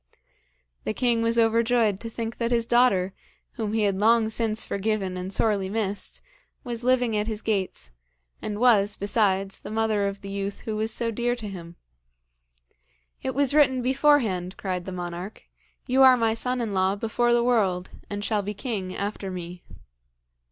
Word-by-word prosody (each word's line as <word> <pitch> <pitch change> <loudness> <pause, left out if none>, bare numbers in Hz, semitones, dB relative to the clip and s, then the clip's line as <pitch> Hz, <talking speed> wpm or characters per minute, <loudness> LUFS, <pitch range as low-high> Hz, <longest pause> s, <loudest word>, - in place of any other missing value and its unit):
The 215 - -3
king 240 -2 +2
was 230 +1 +1
overjoyed 230 -2 +3
to 230 - -6
think 230 0 -5
that 235 -1 0
his 235 -1 +1
daughter, 215 -6 +3 0.4
whom 215 -2 -4
he 220 -1 +1
had 200 -2 +2
long 220 +2 +3
since 220 -1 0
forgiven 200 -2 -1
and 185 +1 -5
sorely 200 -1 +1
missed, 205 -1 -3 0.4
was 240 -1 -5
living 250 -3 +2
at 210 +1 0
his 215 -1 -4
gates, 190 - -2 0.5
and 210 -1 -4
was, 215 -4 +4
besides, 195 -2 0
the - - -8
mother 215 -2 +1
of 200 0 -5
the 200 - -8
youth 200 0 -4
who 220 -3 -4
was 220 +1 -1
so 230 +1 -1
dear 240 +2 0
to 225 -3 -7
him. 175 -3 -8 1.5
'It 260 - -3
was 280 -1 +2
written 260 -4 +4
beforehand,' 250 -9 +2
cried 180 -2 -3
the 190 - -5
monarch. 175 - -6 0.4
'You 260 +2 +2
are 260 -1 +8
my 225 -2 +2
son 250 +2 -2
in 220 -3 -2
law 190 +1 +2
before 230 +3 0
the 240 0 +3
world, 195 -7 +1 0.2
and 205 0 -4
shall 215 -2 +1
be 205 +1 -5
king 195 -6 -4
after 200 -1 -4
me.' 180 -1 -7
215 Hz, 175 wpm, -25 LUFS, 195-235 Hz, 1.5 s, are